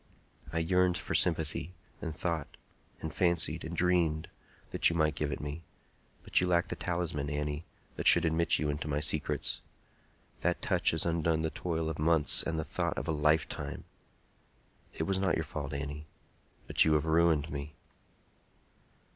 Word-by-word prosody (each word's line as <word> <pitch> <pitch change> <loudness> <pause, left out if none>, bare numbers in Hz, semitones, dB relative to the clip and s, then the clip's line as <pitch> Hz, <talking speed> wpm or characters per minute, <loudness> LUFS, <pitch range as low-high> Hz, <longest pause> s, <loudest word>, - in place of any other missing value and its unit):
I 80 - -3
yearned 90 +2 +2
for - - -5
sympathy, 90 +4 +2 0.3
and 80 -1 -5
thought, 85 -4 -3 0.4
and 80 - -5
fancied, 85 -3 +1
and 85 +1 -6
dreamed 85 -3 +1 0.4
that - - +4
you 85 - -3
might 80 -2 +2
give 75 +1 -2
it 65 - -4
me; 75 +3 -6 0.6
but - - +2
you 90 - +1
lack 85 0 +2
the - - -2
talisman, 85 -5 -2
Annie, 75 +1 -3 0.3
that - - +2
should - - +8
admit 80 0 +2
you 75 - -1
into 75 +1 -4
my 75 -1 -1
secrets. 75 -1 +1 0.8
That - - 0
touch - - +1
has 80 - +1
undone 80 -1 0
the 80 - -1
toil 80 0 -3
of 80 -1 -4
months 80 -1 +4
and 80 - -2
the 80 - -1
thought - - -2
of - - -4
a - - +1
lifetime! 75 +1 0 1.1
It - - -4
was 95 +3 0
not 95 -2 +1
your 80 - -1
fault, 75 -2 -5
Annie; 75 +1 -5 0.6
but - - +4
you 80 - +3
have 75 0 +2
ruined 80 -1 +2
me!" 70 +2 -6
80 Hz, 170 wpm, -31 LUFS, 75-85 Hz, 1.1 s, should